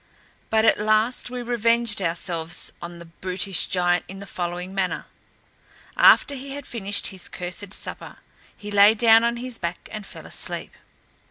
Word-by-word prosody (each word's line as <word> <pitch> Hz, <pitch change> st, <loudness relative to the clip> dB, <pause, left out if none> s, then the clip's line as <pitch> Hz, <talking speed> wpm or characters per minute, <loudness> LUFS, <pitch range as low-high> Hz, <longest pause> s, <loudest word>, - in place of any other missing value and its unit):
But 220 Hz, 0 st, +3 dB
at -, -, +4 dB
last 215 Hz, +4 st, +1 dB
we 250 Hz, 0 st, -5 dB
revenged 235 Hz, -2 st, +1 dB
ourselves 170 Hz, -1 st, -2 dB
on 170 Hz, 0 st, -7 dB
the 170 Hz, -, -11 dB
brutish 185 Hz, +2 st, -1 dB
giant 175 Hz, -1 st, +1 dB
in 195 Hz, -, -9 dB
the 200 Hz, -, -8 dB
following 180 Hz, 0 st, -4 dB
manner. 190 Hz, -2 st, -1 dB, 0.9 s
After 285 Hz, -, +6 dB
he 270 Hz, 0 st, -7 dB
had 285 Hz, -2 st, -7 dB
finished 205 Hz, -3 st, -3 dB
his 185 Hz, -, -6 dB
cursed 180 Hz, +2 st, -5 dB
supper, -, -, -6 dB, 0.4 s
he 210 Hz, -1 st, -8 dB
lay 205 Hz, +2 st, +7 dB
down 225 Hz, 0 st, +6 dB
on 235 Hz, 0 st, +1 dB
his 250 Hz, -1 st, -5 dB
back, 170 Hz, +1 st, -4 dB
and 215 Hz, -1 st, -6 dB
fell -, -, -10 dB
asleep. -, -, -4 dB
205 Hz, 160 wpm, -24 LUFS, 180-230 Hz, 0.9 s, lay